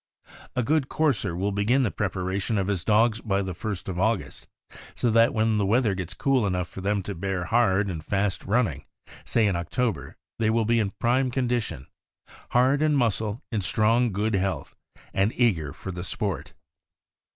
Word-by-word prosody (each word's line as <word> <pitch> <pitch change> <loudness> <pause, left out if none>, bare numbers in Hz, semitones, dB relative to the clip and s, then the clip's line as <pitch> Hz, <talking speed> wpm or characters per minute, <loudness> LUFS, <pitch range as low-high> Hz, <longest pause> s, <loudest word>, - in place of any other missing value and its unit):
A 125 - +1
good 145 +2 +1
courser 110 - 0
will 100 +3 -1
begin 110 +7 +2
the 110 - 0
preparation 95 +2 -2
of 95 - +1
his 95 -3 -1
dogs 110 +2 +3
by 100 -2 0
the 95 -1 -4
1st 100 +2 -5
of 90 -2 -3
August, 110 0 -1 0.5
so 120 - +1
that 115 +1 +5
when 110 -1 +1
the - - +2
weather 110 0 +3
gets 90 -1 -5
cool 130 -4 +2
enough 90 -2 -1
for 95 - -9
them 100 0 0
to 100 - -4
bear 95 0 -2
hard 100 -2 +2
and 80 -5 -4
fast 100 +1 -1
running, 100 - 0 0.4
say 115 -2 +2
in 100 -3 +1
October, 110 +7 -2 0.2
they 110 -1 +2
will 115 0 +2
be 115 +1 +3
in 105 -3 +1
prime 125 +2 +2
condition 120 - -2 0.3
— - - -47 0.2
hard 130 +4 +3
in 155 -1 +3
muscle, 110 -3 0
in 110 -3 0
strong 115 +5 +2
good 105 +3 -1
health, 95 -1 -2 0.4
and 100 +4 +1
eager 90 - +1
for 95 - -7
the 90 -1 -6
sport. 100 +1 -4
105 Hz, 185 wpm, -26 LUFS, 95-120 Hz, 0.5 s, that